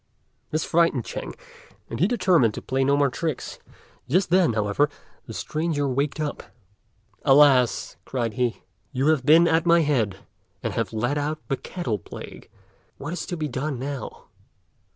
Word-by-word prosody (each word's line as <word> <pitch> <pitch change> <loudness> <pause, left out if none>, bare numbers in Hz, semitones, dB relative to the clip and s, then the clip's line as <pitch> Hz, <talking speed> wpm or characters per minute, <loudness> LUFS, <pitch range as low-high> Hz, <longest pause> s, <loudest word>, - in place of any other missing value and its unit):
This 155 +1 -1
frightened 165 -7 +2
Ch'ên, - - -6 0.5
and - - -6
he 180 - +4
determined 175 - +3
to - - -5
play 135 +1 0
no 140 +1 +3
more 140 -2 +2
tricks; 160 0 -4 0.5
just 175 +4 +2
then, 180 -8 +4
however, 110 +7 +1 0.4
the - - -7
stranger 155 -2 -1
waked 140 +3 -1
up. 150 -1 -3 0.8
"Alas!" 135 -3 +4
cried 120 -4 -2
he, 120 0 -1 0.3
"you 135 +2 +1
have 150 -4 +1
been 165 +3 +7
at 165 +1 +2
my 170 0 +6
head, 120 -10 +1 0.5
and - - -2
have - - -2
let 120 +6 -1
out 150 +2 -2
the 135 - +1
Cattle 125 - -4
Plague. - - -10 0.5
What 145 +4 -5
is 180 - -5
to 175 - -4
be 155 -1 -2
done, 135 +1 -3
now?" 135 +2 -6
145 Hz, 160 wpm, -24 LUFS, 125-160 Hz, 0.8 s, been